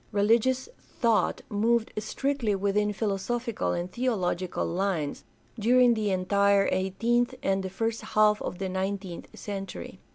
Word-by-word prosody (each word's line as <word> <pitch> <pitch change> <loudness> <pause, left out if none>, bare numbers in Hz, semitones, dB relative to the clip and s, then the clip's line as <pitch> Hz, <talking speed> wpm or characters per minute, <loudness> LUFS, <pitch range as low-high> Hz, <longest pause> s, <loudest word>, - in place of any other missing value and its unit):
Religious 230 - +2 0.3
thought 230 -6 +2
moved 225 +2 +1
strictly 265 -2 -1
within 205 +2 +1
philosophical 220 +3 -2
and 175 +1 -3
theological 185 -7 -1
lines 175 -5 -2 0.4
during 245 +2 +5
the 215 -2 -1
entire 200 +1 +3
eighteenth 235 +7 +1
and 195 0 +1
the 190 - -4
first 225 +4 -2
half 210 0 +3
o" - - -2
the 190 +2 -5
nineteenth 190 -1 -3
century. 195 -2 -6
205 Hz, 125 wpm, -27 LUFS, 190-230 Hz, 0.4 s, during